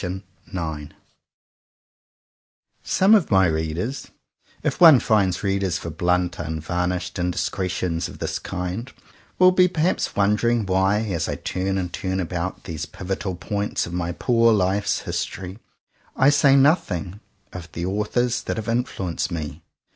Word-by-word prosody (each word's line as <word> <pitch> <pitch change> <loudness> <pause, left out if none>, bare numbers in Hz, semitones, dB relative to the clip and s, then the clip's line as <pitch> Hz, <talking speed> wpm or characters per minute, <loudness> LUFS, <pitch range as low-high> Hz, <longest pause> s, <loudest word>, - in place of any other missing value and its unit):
117 90 -4 -6
IX - - -23 1.9
SOME 190 +4 +3
of 205 -7 +4
my 95 -2 +5
readers, 80 - -2 0.6
if - - -2
one 160 -7 +9
finds 100 -6 +1
readers 95 -2 0
for 85 - -6
blunt, 90 +2 0
unvarnished 85 +3 -3
indiscretions 90 -1 -1
of - - -11
this - - -3
kind, 95 +8 -5 0.5
will 185 0 +7
be 180 0 +5
perhaps 175 0 0
wondering 105 +3 +2
why, 95 +2 +2
as 95 -8 -2
I - - -2
turn 95 +1 -2
and 90 -2 -3
turn 95 0 -2
about 90 0 -3
these 80 +1 -5
pivotal 95 0 -4
points 100 +3 -2
of 85 - -8
my 85 -1 -2
poor 115 +5 +3
life's 100 0 +1
history, 95 +2 -5 0.6
I 135 +2 +5
say 140 -1 +5
noth 140 - +4
ing 90 +3 -4 0.3
of 85 -3 -8
the 85 - -3
"authors 105 +5 0
that - - -4
have 110 - -4
influenced 115 -8 -2
me." 80 -1 -5
95 Hz, 140 wpm, -23 LUFS, 90-110 Hz, 1.9 s, one